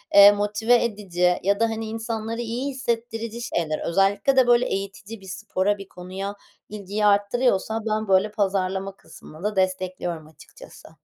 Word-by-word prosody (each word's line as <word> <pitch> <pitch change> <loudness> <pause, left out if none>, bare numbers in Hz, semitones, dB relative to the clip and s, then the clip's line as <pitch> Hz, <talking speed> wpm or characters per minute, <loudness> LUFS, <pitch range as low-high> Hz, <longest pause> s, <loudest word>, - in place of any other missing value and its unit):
eee, 200 0 +10
motive 210 +4 +2
edici 180 -5 0
ya 200 +3 +2
da 230 - +4
hani 225 0 -4
insanları 225 +1 -4
iyi 240 +4 -3
hissettirici 235 -3 -3
şeyler. 160 -9 -2
Özellikle 200 +8 +2
de 260 -2 +5
böyle 240 +1 +5
eğitici 200 +2 -5
bir 190 - -13
spora, 205 +1 -1
bir 195 -1 -10
konuya 190 +3 -6 0.3
ilgiyi 210 0 -3
arttırıyorsa 205 +1 +2
ben, 215 0 -1
böyle, 195 +2 +3
pazarlama 195 -1 -1
kısmını 155 -3 -14
da 210 0 -1
destekliyorum 185 -3 -2
açıkçası. 155 -1 -15
205 Hz, 145 wpm, -24 LUFS, 190-225 Hz, 0.3 s, eee